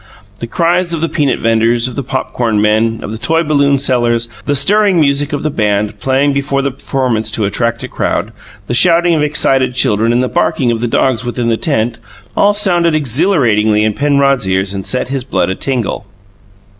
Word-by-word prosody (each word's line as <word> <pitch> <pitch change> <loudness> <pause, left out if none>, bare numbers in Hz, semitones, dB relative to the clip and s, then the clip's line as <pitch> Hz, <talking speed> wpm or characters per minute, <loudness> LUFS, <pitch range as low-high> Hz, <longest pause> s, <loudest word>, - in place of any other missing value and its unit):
The 115 - -5
cries 170 +5 0
of 160 - -5
the 165 - +1
peanut 145 -4 0
vendors, 115 +1 +1
of 125 - -7
the 140 - -2
popcorn 120 -4 -2
men, 110 +2 +1
of - - -6
the 110 - -6
toy 165 +7 +1
balloon 140 -2 +2
sellers, 120 -3 0 0.2
the 145 - 0
stirring 195 +6 +3
music 145 0 +1
of 145 - -3
the 155 - -1
band, 105 -3 -1
playing 135 +4 +1
before 140 0 -1
the 140 - -1
performance 125 -4 -2
to 110 -1 -1
attract 115 +3 -2
a - - -4
crowd, - - -2 0.3
the - - -4
shouting 170 +5 +4
of 155 - +1
excited 135 -4 +1
children 115 -2 +2
and 120 +2 +1
the - - 0
barking 125 0 0
of 115 - -2
the 120 - -2
dogs 125 +1 0
within 120 -1 -2
the 115 - +2
tent, 120 -6 -1 0.4
all 205 0 +3
sounded 175 -5 +2
exhilaratingly 120 - +1
in 110 0 +1
Penrod's 140 -6 +1
ears 95 +1 -1
and 95 -1 -5
set 130 0 -1
his 135 -2 -2
blood 125 - -1
a - - -3
tingle. 120 -6 -3
130 Hz, 195 wpm, -13 LUFS, 115-145 Hz, 0.4 s, shouting